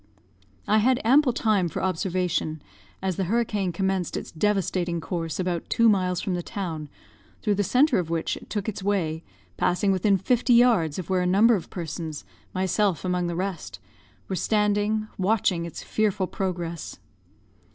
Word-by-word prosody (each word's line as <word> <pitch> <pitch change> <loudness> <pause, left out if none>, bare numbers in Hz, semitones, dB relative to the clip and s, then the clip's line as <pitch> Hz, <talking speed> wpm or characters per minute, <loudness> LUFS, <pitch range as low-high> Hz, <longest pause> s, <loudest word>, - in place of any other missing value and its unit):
"I 215 +1 +4
had 250 +3 +3
ample 270 +3 +5
time 215 -6 +1
for - - -4
observation, 180 -4 -1 0.4
as 190 -3 -1
the 190 - 0
hurricane 210 -2 0
commenced 190 0 -1
its - - -6
devastating 180 -2 0
course 165 0 -4
about 180 -2 -2
two 230 - +4
miles 185 -4 +2
from 190 - -2
the 175 - -1
town, 165 -7 -5 0.5
through 210 - +2
the 205 +1 +1
centre 255 - +3
of 170 -3 -3
which 165 -1 -1
it - - -12
took 205 -1 -3
its 210 -2 -4
way, 170 -5 -1 0.3
passing 180 +3 +2
within 195 +1 +3
fifty 245 +5 +2
yards 220 -11 +4
of 185 0 -5
where 185 -1 +2
a 180 - +1
number 210 +6 +5
of 185 - -5
persons, 160 - -5 0.3
myself 190 -2 0
among 180 -1 0
the 170 - -3
rest, 185 0 -4 0.5
were 190 - -2
standing, 210 +1 +1
watching 185 -3 +1
its 165 - -8
fearful 205 -3 0
progress. 175 -3 -4
190 Hz, 160 wpm, -25 LUFS, 175-210 Hz, 0.5 s, ample